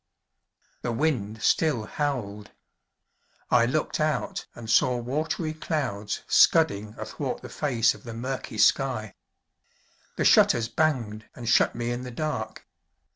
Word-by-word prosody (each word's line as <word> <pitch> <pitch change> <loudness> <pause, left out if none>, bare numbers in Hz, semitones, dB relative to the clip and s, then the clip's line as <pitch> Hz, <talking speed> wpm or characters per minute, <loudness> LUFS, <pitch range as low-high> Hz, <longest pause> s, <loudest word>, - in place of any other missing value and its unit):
The 120 - -2
wind 115 -6 -1
still 150 -9 +2
howled. 110 -8 -3 1.0
I 115 - +5
looked 150 +5 -1
out 155 -4 -1
and 120 -2 -9
saw 125 +2 +3
watery 155 - -2
clouds 140 -10 -3
scudding 105 +2 +3
athwart - - -5
the - - -8
face 120 -4 +1
of - - -15
the 115 -3 -8
murky 125 -1 -5
sky. 115 -3 +2 1.0
The - - -1
shutters 115 -1 +5
banged, 120 -10 -1
and 120 -2 -8
shut - - +3
me 120 0 -2
in 120 +1 -3
the 125 - -7
dark. 120 -4 -4
120 Hz, 130 wpm, -26 LUFS, 110-145 Hz, 1.0 s, I